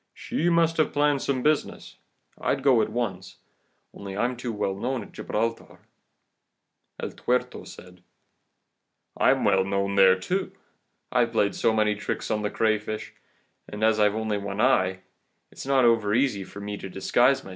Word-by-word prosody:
She 170 Hz, +3 st, -1 dB
must 165 Hz, -1 st, +2 dB
have 155 Hz, -, +1 dB
planned 145 Hz, -1 st, +2 dB
some 130 Hz, -2 st, -1 dB
business. 155 Hz, 0 st, -1 dB, 0.4 s
I'd 135 Hz, -1 st, -1 dB
go 130 Hz, -5 st, +5 dB
at -, -, -1 dB
once, 100 Hz, -5 st, -4 dB, 0.6 s
only 100 Hz, -1 st, -8 dB
I'm 125 Hz, +3 st, 0 dB
too 120 Hz, 0 st, -5 dB
well 105 Hz, -2 st, -2 dB
known 120 Hz, +4 st, -3 dB
at -, -, -14 dB
Gibraltar.' 115 Hz, +2 st, -3 dB, 1.2 s
El -, -, -4 dB
Tuerto -, -, -2 dB
said: 90 Hz, 0 st, -13 dB, 1.1 s
"'I'm -, -, +3 dB
well 95 Hz, -2 st, +3 dB
known 100 Hz, +1 st, -1 dB
there 95 Hz, -1 st, +5 dB
too. 185 Hz, -, -2 dB, 0.6 s
I've 120 Hz, -2 st, +1 dB
played 100 Hz, -3 st, +2 dB
so -, -, +1 dB
many 105 Hz, -1 st, +2 dB
tricks 105 Hz, +1 st, -4 dB
on 105 Hz, -1 st, 0 dB
the 105 Hz, -, -1 dB
crayfish* 110 Hz, -1 st, -1 dB, 0.6 s
and 105 Hz, +1 st, -6 dB
as 110 Hz, 0 st, +3 dB
I've 105 Hz, 0 st, +3 dB
only 110 Hz, -2 st, -1 dB
one 100 Hz, 0 st, -5 dB
eye, 95 Hz, -7 st, +2 dB, 0.5 s
it -, -, -17 dB
is -, -, -7 dB
not 135 Hz, -2 st, +4 dB
overeasy 110 Hz, -1 st, +2 dB
for -, -, -10 dB
me 105 Hz, 0 st, -5 dB
to 95 Hz, -, -8 dB
disguise 125 Hz, +8 st, +2 dB
myself. -, -, -11 dB
110 Hz, 165 wpm, -25 LUFS, 100-125 Hz, 1.2 s, go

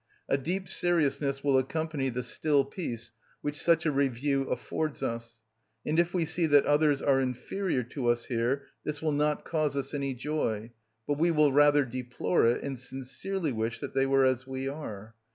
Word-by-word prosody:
A -, -, +2 dB
deep 180 Hz, +8 st, -2 dB
seriousness 145 Hz, -5 st, 0 dB
will 140 Hz, -2 st, +4 dB
accompany 150 Hz, 0 st, -2 dB
the 125 Hz, 0 st, -3 dB
still 145 Hz, 0 st, +1 dB
peace 125 Hz, -7 st, -5 dB, 0.3 s
which 145 Hz, 0 st, -3 dB
such 170 Hz, -1 st, +3 dB
a 155 Hz, -, +3 dB
review 135 Hz, 0 st, 0 dB
affords 150 Hz, +4 st, -2 dB
us; 115 Hz, -1 st, -5 dB, 0.4 s
and 155 Hz, +2 st, +1 dB
if 170 Hz, 0 st, +2 dB
we 175 Hz, -3 st, +1 dB
see 160 Hz, +1 st, 0 dB
that 145 Hz, -2 st, +5 dB
others 145 Hz, -1 st, +3 dB
are 135 Hz, -1 st, +4 dB
inferior 130 Hz, +4 st, -1 dB
to 125 Hz, +1 st, -4 dB
us 120 Hz, 0 st, +2 dB
here, 125 Hz, +3 st, 0 dB, 0.2 s
this 150 Hz, -1 st, -3 dB
will 155 Hz, 0 st, 0 dB
not 150 Hz, +1 st, 0 dB
cause 155 Hz, -4 st, 0 dB
us 140 Hz, +1 st, -3 dB
any 140 Hz, -2 st, -2 dB
joy, 120 Hz, -5 st, -2 dB, 0.4 s
but 145 Hz, 0 st, 0 dB
we 170 Hz, +2 st, +4 dB
will 150 Hz, -4 st, +4 dB
rather 145 Hz, 0 st, +5 dB
deplore 125 Hz, -1 st, 0 dB
it, 120 Hz, -, +1 dB
and 135 Hz, -3 st, -4 dB
sincerely 135 Hz, +7 st, -3 dB
wish 115 Hz, 0 st, -2 dB
that 140 Hz, -, -6 dB
they 135 Hz, 0 st, +2 dB
were 135 Hz, 0 st, +4 dB
as 130 Hz, 0 st, +1 dB
we 130 Hz, 0 st, -4 dB
are. 110 Hz, -7 st, -6 dB
140 Hz, 185 wpm, -29 LUFS, 125-150 Hz, 0.4 s, that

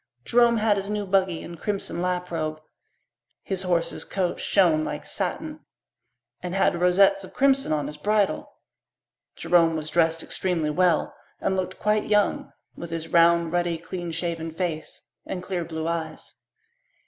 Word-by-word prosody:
Jerome 235 Hz, -1 st, +4 dB
had 215 Hz, -1 st, +2 dB
his 200 Hz, +1 st, -3 dB
new 210 Hz, -1 st, -2 dB
buggy 190 Hz, -3 st, +1 dB
and 170 Hz, -1 st, -9 dB
crimson 195 Hz, -5 st, -3 dB
lap 180 Hz, 0 st, -2 dB
robe. 155 Hz, -2 st, -2 dB, 0.8 s
His 190 Hz, -1 st, -2 dB
horse's 175 Hz, -3 st, -1 dB
coat 180 Hz, -3 st, -2 dB
shone 170 Hz, -6 st, +3 dB
like -, -, -5 dB
satin 310 Hz, -1 st, -3 dB, 0.8 s
and 180 Hz, +1 st, -4 dB
had 175 Hz, -3 st, +2 dB
rosettes 195 Hz, +2 st, +4 dB
of 185 Hz, -, -12 dB
crimson 270 Hz, -, +3 dB
on 150 Hz, -2 st, 0 dB
his 150 Hz, +1 st, -6 dB
bridle. 205 Hz, +4 st, 0 dB, 0.8 s
Jerome 165 Hz, -2 st, +3 dB
was 155 Hz, -1 st, -4 dB
dressed 165 Hz, -1 st, +2 dB
extremely 170 Hz, -5 st, -1 dB
well 175 Hz, 0 st, +2 dB, 0.2 s
and 190 Hz, -, 0 dB
looked 185 Hz, 0 st, -3 dB
quite 210 Hz, 0 st, +1 dB
young, 210 Hz, -1 st, +1 dB, 0.2 s
with 170 Hz, -, -7 dB
his 165 Hz, -1 st, -4 dB
round, 170 Hz, 0 st, +4 dB
ruddy, 175 Hz, -1 st, 0 dB
clean 175 Hz, +1 st, -6 dB
shaven 165 Hz, 0 st, -3 dB
face 160 Hz, -1 st, -5 dB, 0.2 s
and 180 Hz, -1 st, -4 dB
clear 180 Hz, -2 st, -2 dB
blue 160 Hz, -1 st, -4 dB
eyes. 170 Hz, -1 st, -4 dB
175 Hz, 150 wpm, -25 LUFS, 165-195 Hz, 0.8 s, Jerome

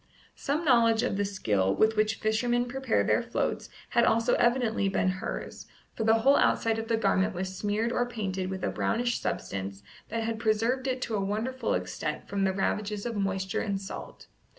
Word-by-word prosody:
Some 300 Hz, +4 st, -2 dB
knowledge 230 Hz, -4 st, +4 dB
of 250 Hz, -, 0 dB
the 205 Hz, +1 st, 0 dB
skill 105 Hz, -, 0 dB
with 220 Hz, 0 st, +3 dB
which 215 Hz, +1 st, +2 dB
fishermen 240 Hz, +3 st, +1 dB
prepare 255 Hz, -1 st, 0 dB
their -, -, +2 dB
floats -, -, -2 dB, 0.2 s
had 235 Hz, -, +3 dB
also 230 Hz, +1 st, +3 dB
evidently 235 Hz, -4 st, +2 dB
been 185 Hz, -1 st, +1 dB
hers, -, -, -5 dB, 0.3 s
for 225 Hz, -, -2 dB
the 220 Hz, +1 st, +5 dB
whole 265 Hz, +5 st, +4 dB
outside 225 Hz, -1 st, +2 dB
of 225 Hz, -, -5 dB
the 230 Hz, -, +1 dB
garment 195 Hz, -1 st, +1 dB
was 185 Hz, +1 st, -4 dB
smeared 210 Hz, +4 st, -1 dB
or 245 Hz, 0 st, 0 dB
painted 190 Hz, -6 st, -3 dB
with 190 Hz, 0 st, -5 dB
a -, -, 0 dB
brownish 240 Hz, +1 st, 0 dB
substance 100 Hz, +1 st, -4 dB, 0.3 s
that 225 Hz, +1 st, -2 dB
had 225 Hz, 0 st, -2 dB
preserved 230 Hz, +4 st, +1 dB
it 255 Hz, -1 st, -1 dB
to 225 Hz, -, -4 dB
a 200 Hz, -, 0 dB
wonderful 225 Hz, +5 st, -1 dB
extent 90 Hz, +12 st, -4 dB
from 195 Hz, 0 st, 0 dB
the 190 Hz, -, +2 dB
ravages 200 Hz, +2 st, -2 dB
of 235 Hz, -2 st, -3 dB
moisture 190 Hz, -1 st, -1 dB
and 200 Hz, -2 st, -1 dB
salt. 195 Hz, -, -8 dB
220 Hz, 190 wpm, -28 LUFS, 195-235 Hz, 0.3 s, the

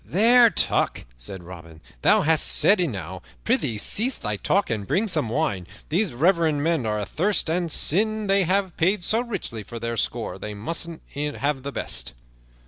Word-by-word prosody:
"There, 235 Hz, +6 st, +5 dB
Tuck," -, -, 0 dB
said 85 Hz, +10 st, -7 dB
Robin, 85 Hz, -2 st, -12 dB, 0.2 s
"thou -, -, +4 dB
hast 160 Hz, +1 st, +3 dB
said 205 Hz, -, +4 dB
enow. 100 Hz, -, -4 dB, 0.2 s
Prythee, 110 Hz, -, 0 dB
cease 235 Hz, -, +2 dB
thy 105 Hz, -, -3 dB
talk 195 Hz, -, 0 dB
and 105 Hz, -3 st, -3 dB
bring 215 Hz, +4 st, +1 dB
some 155 Hz, -, +1 dB
wine. 110 Hz, -, -2 dB, 0.2 s
These 185 Hz, +4 st, +1 dB
reverend 160 Hz, +1 st, +1 dB
men 160 Hz, -7 st, 0 dB
are 105 Hz, 0 st, -1 dB
athirst, 160 Hz, -, 0 dB
and 170 Hz, -1 st, -1 dB
sin' 215 Hz, +8 st, +1 dB
they 195 Hz, -1 st, +2 dB
have 190 Hz, 0 st, 0 dB
paid 180 Hz, +3 st, +1 dB
so 225 Hz, +6 st, +1 dB
richly 200 Hz, -, -5 dB
for 115 Hz, +4 st, -9 dB
their 115 Hz, 0 st, -4 dB
score -, -, -2 dB
they 105 Hz, -1 st, -6 dB
must 165 Hz, +11 st, -3 dB, 0.3 s
e'en 145 Hz, 0 st, -3 dB
have 140 Hz, -1 st, -1 dB
the 140 Hz, +2 st, -6 dB
best." -, -, -4 dB
160 Hz, 175 wpm, -23 LUFS, -, 0.3 s, There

